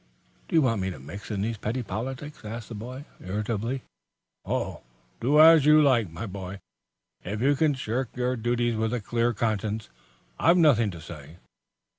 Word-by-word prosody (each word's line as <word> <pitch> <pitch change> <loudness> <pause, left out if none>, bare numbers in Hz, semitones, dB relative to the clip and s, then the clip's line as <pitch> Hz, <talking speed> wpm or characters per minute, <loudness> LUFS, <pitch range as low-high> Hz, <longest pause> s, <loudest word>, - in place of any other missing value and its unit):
"Do - - -3
you 160 - +6
want 115 -6 +1
me 95 - -1
to 90 - -6
mix 85 +10 -9
in 100 -2 -2
these 115 +1 -2
petty 120 +5 -2
politics?" 135 +6 -6
asked 110 +1 -7
the - - -6
boy, 125 +6 -7 0.2
irritably. 105 +6 -2 0.6
"Oh, - - -3 0.4
do 140 +6 +3
as 160 -2 +8
you 150 0 +8
like, 125 - +3
my 80 +7 -6
boy. 95 -1 -7 0.6
If 105 +4 -4
you 140 +4 +3
can 150 0 +2
shirk 125 0 -2
your 125 0 0
duties 120 0 0
with 110 +2 0
a - - -1
clear 115 +3 0
conscience, 110 -1 -2 0.5
I've 170 +2 +5
nothing 130 - +4
to 85 -4 -8
say." 80 0 -11
115 Hz, 175 wpm, -26 LUFS, 105-130 Hz, 0.6 s, as